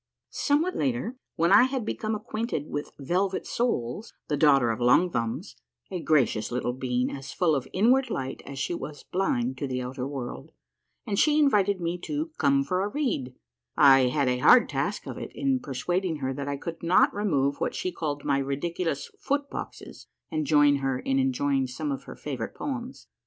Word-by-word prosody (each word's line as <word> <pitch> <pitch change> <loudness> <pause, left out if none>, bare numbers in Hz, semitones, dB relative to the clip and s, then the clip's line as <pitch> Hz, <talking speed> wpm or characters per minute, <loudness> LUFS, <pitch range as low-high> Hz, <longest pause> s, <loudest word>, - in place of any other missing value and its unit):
Somewhat 315 +6 +1
later, 140 - -1 0.2
when 170 +1 +2
I - - +8
had 260 -3 -2
become 220 0 -2
acquainted 215 -7 -3
with 145 0 -3
Velvet 185 +7 -1
Soles, 215 - -2 0.2
the 150 - +1
daughter 140 -5 +4
of 110 - -4
Long 145 +9 +4
Thumbs, 115 -4 -3 0.4
a 180 - -3
gracious 125 -9 +2
little 125 0 -1
being 125 -1 -1
as 135 -1 -7
full 170 -3 +2
of 135 -3 -1
inward 250 +6 +3
light 135 - -4
as 140 0 -9
she 140 - -2
was 145 -3 -7
blind 130 -9 -1
to 140 - -2
the 130 -1 -2
outer 130 +1 -4
world, 125 - -6 0.5
and 200 -2 -1
she 300 -1 +4
invited 205 -10 +3
me 170 +1 -2
to 305 - -3
" - - -39
come 275 0 +3
for 185 -7 -1
a 200 - 0
read," 205 - -2 0.4
I 135 -2 +7
had 140 +1 +1
a 125 0 +1
hard 245 - +6
task - - -2
of - - -6
it - - -7
in 270 -2 +1
persuading 175 - -2
her 135 -3 -3
that 140 +1 -5
I 140 0 -2
could 165 +3 -7
not 170 +2 +4
remove 145 -9 0
what - - -1
she 185 - -2
called 145 -4 -4
my 140 -1 +2
ridiculous 145 +3 -2
" - - -37
foot 285 0 -1
boxes - - -8
" - - -50
and 155 -2 -1
join 145 -1 +5
her 135 -2 -1
in 135 +1 0
enjoying 135 +1 +1
some 145 +4 -4
of 135 0 -5
her - - -9
favorite 130 -6 -5
poems. 260 -2 -5
145 Hz, 195 wpm, -27 LUFS, 135-200 Hz, 0.5 s, I